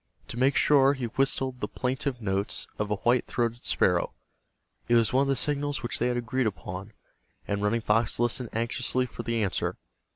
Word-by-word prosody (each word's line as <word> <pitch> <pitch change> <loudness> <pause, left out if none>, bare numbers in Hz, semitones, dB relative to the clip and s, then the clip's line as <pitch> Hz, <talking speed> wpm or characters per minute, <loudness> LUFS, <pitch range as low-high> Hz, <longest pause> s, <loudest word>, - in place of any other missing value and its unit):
To 115 - -6
make 130 +2 +3
sure 140 -1 +5
he 130 -3 -3
whistled 130 +1 0
the - - -2
plaintive 130 -1 -2
notes 100 0 -1
of 105 - 0
the 105 - +1
white 120 +4 +2
throated 120 -1 -1
sparrow. - - +2 0.7
It 120 - +4
was 115 0 +3
one 130 - +4
of 140 - +2
the 135 - +2
signals 145 +2 -1
which 120 - -3
they - - +2
had 125 0 0
agreed 120 +1 0
upon, 95 0 -6 0.5
and 100 0 -1
Running 110 +3 +1
Fox 115 +1 +1
listened 120 0 0
anxiously 120 +2 0
for 125 - -7
the 115 -2 0
answer. 95 - -1
120 Hz, 190 wpm, -28 LUFS, 110-130 Hz, 0.7 s, sure